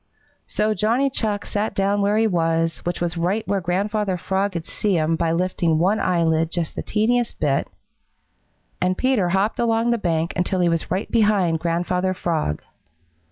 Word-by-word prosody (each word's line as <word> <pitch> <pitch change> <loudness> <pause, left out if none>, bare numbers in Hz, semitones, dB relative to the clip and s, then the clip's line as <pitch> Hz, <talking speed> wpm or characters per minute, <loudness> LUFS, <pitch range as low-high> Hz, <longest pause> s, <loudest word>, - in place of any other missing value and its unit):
So 215 +1 0
Johnny 230 +7 +1
Chuck 210 -5 -1
sat 210 +1 -2
down 200 +1 +1
where 205 +1 +2
he 225 - +3
was, 165 -4 0
which 175 0 -2
was 175 0 -2
right 190 +6 -1
where 200 -1 0
Grandfather 195 +2 -1
Frog 190 +2 -1
could 170 -1 -4
see 205 +1 -1
him 160 +1 +1
by 165 0 0
lifting 170 -2 +1
one 190 +6 +2
eyelid 165 -2 +1
just 170 -2 -2
the - - -3
teeniest 235 +2 0
bit, 140 -2 +1 1.1
and 185 0 +1
Peter 255 -9 +1
hopped 195 +4 0
along 230 0 +2
the 235 - +1
bank 165 -3 -1
until 180 +1 0
he 175 -1 +3
was 165 -1 -1
right 185 +4 -2
behind 205 -7 +2
Grandfather 180 +3 -1
Frog. 155 - -2
185 Hz, 170 wpm, -22 LUFS, 170-210 Hz, 1.1 s, he